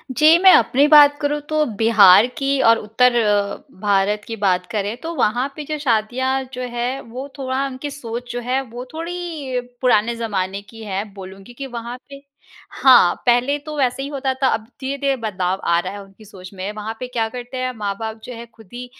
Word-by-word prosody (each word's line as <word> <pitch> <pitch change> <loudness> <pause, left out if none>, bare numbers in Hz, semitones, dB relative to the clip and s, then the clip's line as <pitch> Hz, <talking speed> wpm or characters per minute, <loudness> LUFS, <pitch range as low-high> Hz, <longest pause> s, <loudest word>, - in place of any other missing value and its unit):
जी, 310 +4 +6
मैं 380 0 +8
अपनी 265 +5 +3
बात 290 -1 +7
करूँ 295 +1 0
तो 310 0 +2 0.2
बिहार 220 -2 +7
की 275 0 0
और 230 0 +6
उत्तर 225 +4 +2 0.7
भारत 205 0 +1
की 225 - -4
बात 180 -2 +2
करें 210 0 -2
तो 330 +1 -5
वहाँ 245 0 +1
पे 305 - -6
जो 305 - -2
शादियाँ 260 +1 0
जो 250 - -5
है 245 +3 -2
वो 250 +4 -8
थोड़ा 265 0 -2
उनकी 275 +2 -6
सोच 245 -3 -7
जो 245 - -4
है 255 +3 -1
वो 245 +2 -7
थोड़ी 325 -6 -4 0.2
पुराने 235 -2 +2
ज़माने 200 -4 -3
की 225 -1 -11
है 200 -1 -3
बोलूँगी 195 +3 -11
कि 270 +2 -7
वहाँ 240 0 -7
पे 275 0 -11 0.5
हाँ, 245 -10 +5
पहले 245 +4 +3
तो 300 +1 -8
वैसे 265 -1 0
ही - - -4
होता 270 -2 -2
था। 265 - +4
अब 220 0 -3 0.2
धीरे-धीरे 275 0 -1
बदलाव 190 -5 -2
आ 170 0 +3
रहा 185 +2 -5
है 205 - -8
उनकी 195 +2 -18
सोच 185 -3 -12
में 190 +1 -5
वहाँ 215 +1 -5
पे 255 - -5
क्या 230 -3 -1
करते 245 +2 -8
हैं 255 0 -2
माँ-बाप 220 +2 -4
जो 250 - -8
है 235 0 -9
ख़ुद 220 -5 -17
ही 245 +1 -6
245 Hz, 200 wpm, -20 LUFS, 210-270 Hz, 0.7 s, मैं